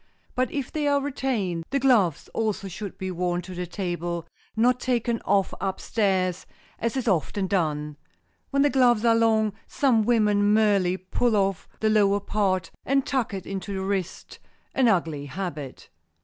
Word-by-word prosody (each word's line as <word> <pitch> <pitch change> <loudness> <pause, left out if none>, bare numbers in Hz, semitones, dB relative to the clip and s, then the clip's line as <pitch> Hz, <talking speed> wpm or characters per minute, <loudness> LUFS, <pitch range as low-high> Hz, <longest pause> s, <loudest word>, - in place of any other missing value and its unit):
But 255 -1 0
if 280 -4 -3
they 300 -2 -1
are 285 0 +3
retained, 255 -11 -2
the 275 - 0
gloves 235 - +3
also 215 -3 -1
should 195 +2 -7
be 190 0 -4
worn 175 0 -1
to 185 - -8
the 180 0 -4
table, 175 -2 -3 0.3
not 245 +3 +3
taken 235 -2 0
off 195 -1 +2
up 190 -1 -2
stairs, 190 -4 0 0.3
as 230 +3 -1
is 255 - -2
often 190 +1 +1
done. 150 -6 -1 0.5
When 275 0 +2
the 290 - +3
gloves 240 -3 +4
are 230 - +6
long, 220 -2 +3
some 255 -6 +2
women 210 -2 +3
merely 200 -4 +3
pull 215 +5 0
off 195 -3 0
the 220 - +3
lower 205 -2 +4
part 195 -4 -1
and 275 0 +1
tuck 260 -5 -1
it 195 -2 -5
into 195 +1 -5
the 190 - -2
wrist, 190 -2 -4 0.3
an 260 -2 +3
ugly 165 -8 0
habit. 150 -4 -6
200 Hz, 165 wpm, -25 LUFS, 185-235 Hz, 0.5 s, are